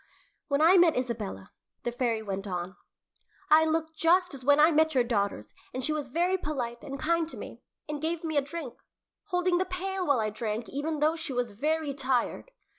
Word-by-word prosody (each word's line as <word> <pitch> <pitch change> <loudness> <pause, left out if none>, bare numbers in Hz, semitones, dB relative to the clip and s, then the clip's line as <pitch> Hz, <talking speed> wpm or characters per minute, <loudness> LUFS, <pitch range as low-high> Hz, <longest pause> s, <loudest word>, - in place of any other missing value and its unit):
"When 280 +2 +2
I 355 +4 +7
met 340 -5 +5
Isabella," 220 - -4 0.3
the 240 - -1
fairy 235 -2 -1
went 195 -1 -4
on, 180 0 -4 0.8
"I 315 +1 +7
looked 320 0 -1
just 355 +2 +3
as 265 -2 -6
when 285 +2 +5
I 310 +3 +7
met 315 -1 +3
your 250 - +5
daughters, 200 - -2 0.2
and 255 - -1
she 310 - +1
was 295 -3 -3
very 355 +6 +1
polite 245 -7 -4
and 275 0 -6
kind 330 +2 +1
to - - -9
me, - - -9 0.3
and 300 -1 -4
gave 325 +1 -2
me 315 -2 -3
a 285 - +4
drink, 285 -2 -6 0.5
holding 360 -2 +1
the 375 - +1
pail 370 0 -3
while 285 -4 +3
I 215 -1 0
drank, 220 +1 -3
even 295 +2 -3
though 310 +2 +3
she 320 -4 -3
was 245 -2 -1
very 300 +6 -1
tired. 265 - -1
290 Hz, 200 wpm, -28 LUFS, 240-325 Hz, 0.8 s, I